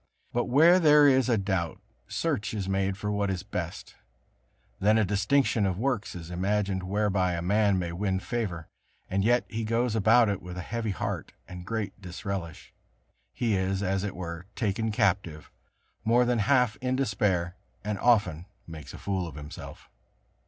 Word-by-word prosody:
But 120 - +1
where 160 +8 +6
there 150 -3 +6
is 130 -2 +4
a 115 - +3
doubt, 95 -4 -2 0.3
search 110 +1 -2
is 100 -3 -3
made 95 0 0
for 105 +1 -3
what 100 -1 0
is 95 -1 -2
best; 90 -4 -5 0.9
then 105 +3 +4
a 110 - +3
distinction 105 +3 +2
of 95 -2 0
works 110 -4 -1
is 85 -1 -8
imagined 95 +1 0
whereby 95 -1 0
a 85 - -2
man 100 +1 +3
may 85 -2 -2
win 95 +2 -1
favor; 95 -7 -3 0.4
and 95 +1 +1
yet 120 +3 +3
he 110 +1 -4
goes 115 +1 0
about 110 +2 +5
it 100 -2 -1
with 90 0 -8
a - - -3
heavy 115 +1 -3
heart, 95 - -4
and 90 -1 -9
great 105 -2 -4
disrelish; 90 -2 -6 0.6
he 115 -3 -1
is, 95 +1 0
as 95 0 0
it 100 -5 -4
were, 85 0 -6
taken 110 0 -1
captive, 90 -7 0 0.5
more 120 +2 +4
than 120 -1 +1
half 125 0 +3
in 130 0 -1
despair, 100 -8 0 0.3
and 105 -1 -3
often 95 -8 +2 0.2
makes 80 -4 -9
a - - -8
fool 95 -3 -2
of 80 - -9
himself. 75 0 -9
100 Hz, 170 wpm, -28 LUFS, 90-115 Hz, 0.9 s, where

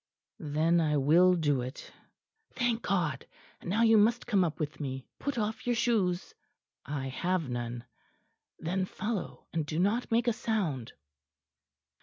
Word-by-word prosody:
"Then 155 +3 +2
I 150 -2 +2
will 170 +6 +5
do 145 -6 +1
it." 130 +4 -8 0.6
"Thank 240 -2 +1
God! 160 -9 -1 0.3
And - - -7
now 220 +5 +2
you 225 -1 +6
must 230 +3 +3
come 205 -6 +3
up 160 -3 -2
with 150 -2 -3
me. 135 -3 -4
Put 285 -3 -3
off 220 +1 -2
your 240 - +2
shoes." 210 -6 +1 0.5
"I 135 -1 -4
have 175 +4 -1
none." 120 -1 -4 0.7
"Then 185 +3 -1
follow, 210 +1 -4
and 165 -1 0
do 150 +2 -4
not 205 +8 +1
make 235 +1 +2
a 235 - +4
sound." 185 - -2
175 Hz, 150 wpm, -30 LUFS, 145-220 Hz, 0.7 s, you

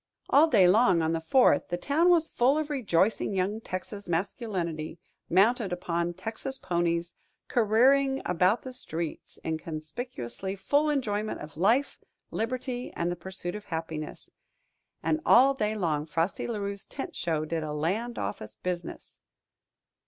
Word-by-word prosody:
All 300 +3 +7
day 200 - +5
long 185 -4 +4
on 160 +1 +1
the 165 - -1
Fourth, 250 +11 +4
the 175 - -2
town 310 - +2
was 335 -2 +4
full 265 +2 +2
of 310 -1 -2
rejoicing 210 - +1
young 195 +4 0
Texas 200 0 -6
masculinity, 170 -3 -2 0.3
mounted 205 +3 +3
upon 175 -1 -2
Texas 225 +8 -3
ponies, 170 -2 -1 0.3
careering 265 +5 +4
about 180 +6 +2
the 260 - -7
streets 170 -10 -6
in 160 -1 -2
conspicuously 155 - -5
full 285 +10 +2
enjoyment 215 -7 -1
of 150 0 -9
life, 225 - +2 0.3
liberty, 245 +2 -3
and 170 +1 -1
the - - -2
pursuit 175 0 -6
of 210 0 -7
happiness. 160 -3 -5 0.7
And 310 - +1
all 265 +3 +6
day 215 -5 -1
long 155 -6 -1
Frosty 165 +4 -1
La 235 -2 -2
Rue's 200 -1 -4
tent - - -6
show 160 -3 -1
did 165 +1 -2
a 155 -1 -4
land 195 +11 -2
office 105 +2 -5
business. 175 +6 -5
190 Hz, 145 wpm, -28 LUFS, 170-245 Hz, 0.7 s, All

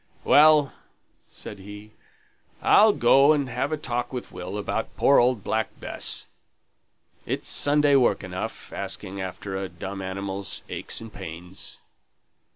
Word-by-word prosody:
"Well," 150 -1 +6 0.5
said 105 - -10
he, 105 +2 -11 0.7
"I'll 215 +1 +6
go 135 -1 +5
and 145 -3 0
have 125 +5 -2
a 155 - 0
talk 120 -4 -3
with 125 -2 -6
Will 90 +2 -6
about 110 +2 -3
poor 140 - +5
old 120 -4 +2
Black 110 -1 -2
Bess. - - -2 1.0
It's - - -3
Sunday 145 0 +3
work 130 -3 +3
enough, - - -6
asking 95 +1 -4
after 95 +1 -6
a 95 0 -3
dumb 95 +3 -7
animal's 95 +1 -4
aches - - -3
and 115 -1 -10
pains." 90 +3 -7
110 Hz, 135 wpm, -25 LUFS, 95-140 Hz, 1.0 s, Well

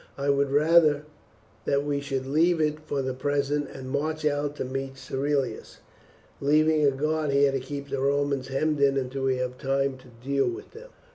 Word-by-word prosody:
I 140 0 +1
would 140 0 +1
rather 150 0 +4 0.6
that 140 +1 +1
we 145 -1 0
should 135 -2 -3
leave 160 +5 +2
it 150 -1 +1
for 145 -3 -3
the 130 0 -2
present 145 +2 -1
and 130 -1 -8
march 155 +2 -2
out 145 0 0
to - - -3
meet 135 +1 -4
Cerealis, 135 -3 -2 0.6
leaving 155 +2 +3
a 145 - +6
guard 155 +2 -1
here 140 0 +4
to 135 - -1
keep 140 +2 -6
the 140 - -2
Romans 140 -1 0
hemmed 150 +3 0
in 140 -1 +4
until 135 0 -2
we 130 -1 +2
have 125 0 -3
time 135 -1 0
to 130 - -17
deal 130 +4 -1
with 380 +4 -8
them." - - -12
140 Hz, 190 wpm, -26 LUFS, 135-150 Hz, 0.6 s, a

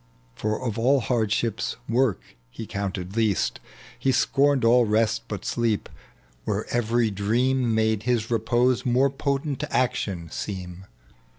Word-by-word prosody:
For 110 - -2
of 115 -3 -3
all 135 +4 +4
hardship, 115 -2 0 0.3
work 120 -5 +1 0.3
he - - -8
counted 95 -1 -4
least; 105 - +1 0.4
He 135 - +2
scorned 135 +1 +2
all 120 +1 +6
rest 115 +1 +1
but 105 -2 -6
sleep, 115 -3 -1 0.5
where - - -2
every 120 -1 +1
dream 120 +4 +1
Made 110 -1 +1
his 115 -1 -1
repose 120 +2 +2
more 130 +2 +2
potent 140 +1 -2
action 100 -10 -1
seem. 95 -2 -6
115 Hz, 125 wpm, -25 LUFS, 105-125 Hz, 0.5 s, all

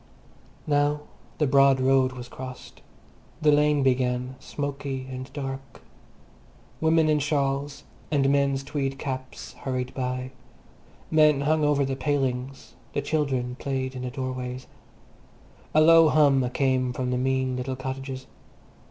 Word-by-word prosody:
Now 145 0 +1 0.4
the 150 - +2
broad 135 -1 +5
road 130 0 +3
was 125 -1 -8
crossed. 130 +1 -10 0.6
The 155 -2 +4
lane 150 -1 +3
began, 125 0 0
smoky 140 -2 -4
and 130 0 -7
dark. 135 -1 -6 1.0
Women 160 0 +3
in 150 -1 +3
shawls 140 -1 -1 0.3
and 140 -3 +2
men's 140 -1 +1
tweed 135 -1 -3
caps 130 -1 -6
hurried 130 -1 -3
by. 125 0 -3 0.8
Men 155 -3 +5
hung 155 +2 +2
over 145 -1 +3
the 135 0 -2
palings; 135 -2 -2 0.2
the 145 - -1
children 135 -5 -1
played 130 -1 -2
in 130 - -6
the 125 - -3
doorways. 130 -1 -5 1.1
A 155 - +7
low 165 0 +7
hum 140 -4 +4
came 130 -1 +1
from 125 0 -2
the 125 - 0
mean 130 0 0
little 130 +1 -3
cottages. 130 0 -5
135 Hz, 130 wpm, -26 LUFS, 130-145 Hz, 1.1 s, A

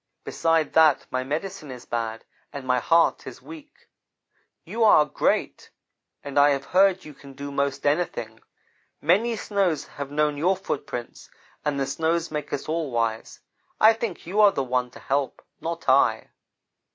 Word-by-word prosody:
'Besides 165 -2 0
that, 155 -3 +4
my 130 0 -1
medicine 155 +4 -5
is 125 -1 -9
bad 115 -1 -4 0.3
and 140 -2 -7
my 125 -1 +2
heart 165 +7 +2
is - - -9
weak. 310 -2 -14 0.8
You 230 - -1
are 155 -8 +6
great, - - -1 0.5
and 140 0 -1
I 145 +1 +6
have 140 -1 -1
heard 190 +1 +3
you 150 - -10
can 140 0 -14
do 140 +1 -7
most 140 -1 -2
anything. 130 -8 -1 0.6
Many 210 +9 +2
snows 195 -7 -1
have 140 -1 -7
known 150 0 0
your 180 +5 +2
footprints, 130 -9 -6 0.3
and 145 -2 -1
the 135 - 0
snows 165 +3 -1
make 150 -1 -4
us 145 - -4
all 160 -1 -2
wise. 115 -2 -2 0.4
I 220 +1 +7
think 225 -4 -5
you 200 +5 +1
are 205 -1 +7
the 135 - -2
one 125 -1 -1
to - - -14
help, 135 -1 -2 0.2
not 165 0 -5
I.' 135 +1 +3
150 Hz, 165 wpm, -24 LUFS, 135-175 Hz, 0.8 s, I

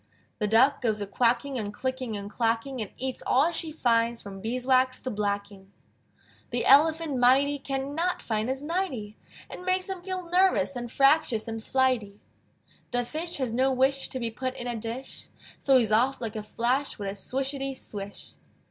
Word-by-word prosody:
The 210 - +1
Duck 250 +7 +4
goes 220 -4 0
a 205 - -2
quacking 240 +5 +1
And 205 -2 -3
clicking 255 -1 -3
and 200 0 -6
clacking, 230 +4 -1
And 210 - -4
eats 260 0 -3
all 285 +7 +4
she 325 -1 -3
finds 235 -5 +1
From 195 -1 -8
beeswax 255 +3 +1
to 255 - -3
blacking. 200 -2 -3 0.8
The 240 - 0
Elephant 310 +1 +5
mighty 275 +4 +4
Can 275 +1 -3
not 345 +4 0
find 220 +1 -2
his 265 +2 -2
nighty! 295 - -2 0.3
It - - -9
makes 370 +1 0
him 380 -2 -4
feel 370 -1 -5
nervous, 360 -5 +3
And 240 -1 -5
fractious 275 -5 +3
and 225 -1 -5
flighty. 245 -7 +1 0.7
The 245 -1 0
Fish 330 +6 -4
has 255 -5 -2
no 260 +3 +2
wish 265 +1 +2
To 260 - -4
be 230 -2 -2
put 255 +2 -4
in 240 - -5
a 240 -1 -2
dish, 230 +4 -6 0.3
So 270 -2 +5
he's 225 -4 +2
off 250 +5 +3
like 225 -2 -4
a 215 - -3
flash 245 +6 -1
With 200 - -5
a 195 - -2
swishety 270 +5 -3
swish. 200 -4 -7
255 Hz, 180 wpm, -27 LUFS, 225-275 Hz, 0.8 s, Elephant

